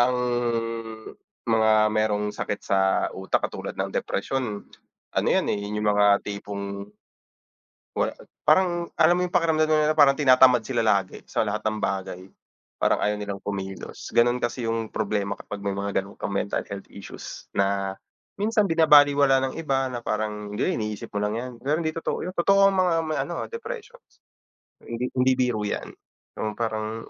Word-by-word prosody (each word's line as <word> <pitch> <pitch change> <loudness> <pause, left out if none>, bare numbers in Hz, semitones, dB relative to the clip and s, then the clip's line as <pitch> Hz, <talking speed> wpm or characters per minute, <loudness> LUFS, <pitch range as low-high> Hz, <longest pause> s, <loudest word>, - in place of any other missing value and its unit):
ang 125 +1 +4 1.4
mga 110 -1 +4 0.2
merong 105 -1 0
sakit 105 - -4
sa 100 - +1 0.3
utak 95 0 -1
katulad - - -6
ng - - -3
depresyon, 110 -1 -2 0.6
ano - - 0
'yan, - - +2
eh, 105 - 0
yung 105 +1 -3
mga 105 0 +4
tipong, 100 -1 -5 1.1
wala - - +1 0.3
parang 175 -2 +3
alam 165 +2 +5
mo - - +1
yung 180 - -16
pakiramdam 160 -2 +3
nila, 155 0 +3
parang 140 -1 +7
tinatamad 130 -4 +6
sila 120 +1 -2
lagi 100 -3 +1
sa - - 0
lahat 105 0 -2
ng 110 0 -1
bagay. 95 -2 -2 0.6
Parang - - +2
ayaw 105 0 +1
nilang 100 -1 -5
kumilos, 95 -1 -6
ganon 120 +1 +5
kasi 120 -1 -2
yung 115 -1 -2
problema 100 -2 -1
kapag 100 -1 -8
may 100 - -1
mga 100 0 -3
ganon 100 - -13
kang - - -3
mental 100 - 0
health 100 -1 -6
issues 100 - -9
na 100 0 0 0.4
minsan 215 0 +2
binabalewala 145 -4 +5
ng - - -11
iba 135 -4 0
na 120 -2 -6
parang, 105 -1 -3
"Hindi, 185 - 0
iniisip 105 -2 -4
mo 100 - 0
lang 105 +1 -1
yan." 125 +1 -5
Pero 150 +4 +1
hindi 160 -1 -1
totoo 165 - -3
'yun. 185 - -6
Totoo 195 +3 +5
ang - - -2
mga 180 -2 +3
may 155 - -1
ano, 165 +5 -3
ah, - - -6
depressions, 470 +1 -9 0.7
hindi 120 +2 -3
hindi 130 +1 +4
biro 125 -4 +1
'yan. - - -4 0.5
'Yung 110 -1 -2
parang 110 0 -3
115 Hz, 165 wpm, -25 LUFS, 105-150 Hz, 1.4 s, parang